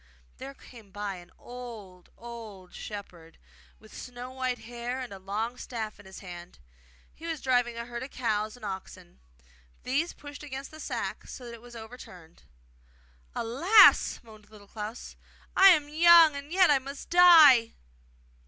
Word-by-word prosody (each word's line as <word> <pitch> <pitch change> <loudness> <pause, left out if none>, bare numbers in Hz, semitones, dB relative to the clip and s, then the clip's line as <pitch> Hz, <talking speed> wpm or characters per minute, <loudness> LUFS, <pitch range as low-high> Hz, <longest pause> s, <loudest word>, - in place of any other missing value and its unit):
There 275 +1 -9
came 230 -7 -16
by 205 -1 -5
an 175 0 -14
old, 225 -8 -11
old 220 -6 -11
shepherd, 175 -6 -10 0.4
with 215 - -17
snow 250 0 -9
white 255 -1 -3
hair 240 +2 -6
and 250 -5 -7
a 195 - -10
long 215 +6 -4
staff 220 -4 -6
in 205 - -15
his 190 - -11
hand. 175 -1 -11 0.6
He 330 - -10
was 325 -2 -4
driving 245 -3 0
a 235 - -5
herd 240 0 -7
of 260 - -7
cows 215 -4 -2
and 245 - -11
oxen. 190 - -9 0.6
These 285 +7 -1
pushed 290 0 -11
against 275 -2 -8
the 310 - -12
sack - - -5
so 250 - -10
that 235 - -9
it 230 - -12
was 240 0 -14
overturned. 220 -8 -13 0.9
'Alas!' 335 - +5
moaned 215 -2 -17
Little 210 -2 -16
Klans, 215 +2 -8 0.4
'I 385 - +8
am 335 -6 +6
so 295 +1 -15
young 335 -1 +7
and 280 +2 -8
yet 370 -2 +4
I 280 - +4
must 275 +2 -10
die! 315 -10 +7
240 Hz, 160 wpm, -28 LUFS, 210-275 Hz, 0.9 s, I